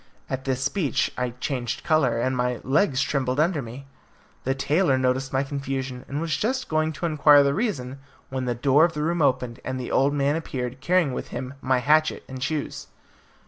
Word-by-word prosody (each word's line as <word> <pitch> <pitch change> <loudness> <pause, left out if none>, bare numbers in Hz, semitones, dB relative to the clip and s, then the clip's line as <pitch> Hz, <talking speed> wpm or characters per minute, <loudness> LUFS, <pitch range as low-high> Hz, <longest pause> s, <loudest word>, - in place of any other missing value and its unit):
At 130 0 -3
this 130 -1 -1
speech 165 -5 0
I 125 0 -1
changed 130 0 -3
colour, 150 -8 +2
and 130 +2 0
my 125 -1 -1
legs 140 - +2
trembled 130 -1 -1
under 160 -1 +2
me. 125 +3 -9 0.6
The 135 +1 +1
tailor 145 +1 +2
noticed 130 +1 0
my 130 +1 +1
confusion, 135 -2 -4
and 145 - -3
was 165 -1 -1
just 255 +4 -1
going 155 0 +1
to 170 - -4
inquire 150 -2 +6
the 140 0 +2
reason 140 - -2 0.3
when 130 -1 -3
the 120 -1 -1
door 135 +5 +4
of 170 0 +3
the 150 -1 -2
room 170 +1 0
opened, 125 -3 +1
and 130 0 -3
the 125 - -5
old 140 +2 +2
man 140 +1 +1
appeared, 130 -5 -4
carrying 170 -2 +2
with - - -4
him 125 +2 -6
my 130 0 +2
hatchet 155 +4 +2
and 130 -1 -8
shoes. 150 +2 -3
135 Hz, 195 wpm, -25 LUFS, 130-155 Hz, 0.6 s, inquire